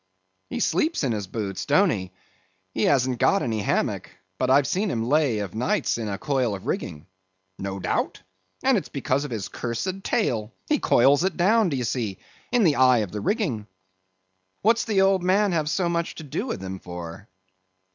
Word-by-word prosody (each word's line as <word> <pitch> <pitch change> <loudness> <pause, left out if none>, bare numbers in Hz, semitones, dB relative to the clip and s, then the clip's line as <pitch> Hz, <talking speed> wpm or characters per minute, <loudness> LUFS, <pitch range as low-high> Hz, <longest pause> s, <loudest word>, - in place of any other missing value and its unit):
"He - - -3
sleeps 300 - +1
in 130 - +1
his 105 -4 -3
boots, 100 -2 -4
don't 180 +6 +4
he? 95 -3 -3 0.6
He 110 - +1
hasn't 130 -3 +2
got 200 - +3
any 110 -3 -1
hammock; - - -1 0.3
but 130 - +1
I've 135 +1 +5
seen 190 +8 0
him 115 -3 -1
lay 145 -4 +2
of 100 -4 -4
nights 145 - 0
in 110 - -3
a 100 - -3
coil 130 -7 0
of 95 - -10
rigging." 75 +2 -3 0.5
"No 95 0 -4
doubt, - - -2 0.4
and 260 -5 +4
it's - - -11
because 140 0 -1
of - - -5
his 110 -6 -4
cursed 185 +12 -4
tail; 115 - -1
he 300 - +2
coils 140 +6 +4
it 190 -3 -1
down, 210 +3 +4
do 140 - -1
ye 125 - -1
see, 115 -4 -2 0.3
in 245 -3 +3
the 155 -6 +3
eye 130 -1 +6
of 90 - -14
the 105 - -4
rigging." 130 - -1 1.0
"What's 225 +2 +3
the 205 -4 +2
old 195 -1 +4
man 195 +3 +3
have 155 -3 0
so 175 +2 +1
much 170 -1 -1
to 160 - -8
do 145 - -4
with 95 - -4
him 95 0 -5
for?" 90 +2 -8
135 Hz, 195 wpm, -25 LUFS, -, 1.0 s, eye